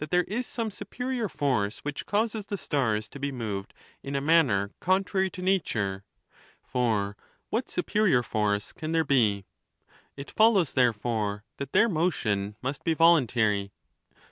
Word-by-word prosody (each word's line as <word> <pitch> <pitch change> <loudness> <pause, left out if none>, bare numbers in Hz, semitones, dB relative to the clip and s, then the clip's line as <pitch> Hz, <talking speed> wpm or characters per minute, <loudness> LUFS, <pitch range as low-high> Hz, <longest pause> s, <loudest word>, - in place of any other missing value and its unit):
2 150 - -3
'71 180 +2 +2
there 210 - -4
is 250 - -3
some 230 -2 -3
superior 235 +3 -4
force 115 -10 -1
which 145 -1 -4
causes 215 0 -1
the 200 - -3
stars 115 - -1
to 140 - -11
be 140 0 -2
moved 105 -6 -4 0.3
in 140 0 -5
a - - +2
manner 135 -10 +3
contrary 190 +1 +1
to 180 0 -8
nature. 110 - 0 0.6
For 110 -5 0 0.4
what 235 +3 -1
supe 180 - -4
rior 185 - +3
force 105 -1 -1
can 155 +1 -5
there 165 0 +3
be? 105 -8 +2 0.7
It 140 - -8
follows, 210 - +4
therefore, 110 -4 0
that 140 -1 -5
their 230 - +5
motion 110 - 0
must 135 +3 -3
be 165 - +1
voluntary. 115 -12 +3
140 Hz, 155 wpm, -27 LUFS, -, 0.7 s, their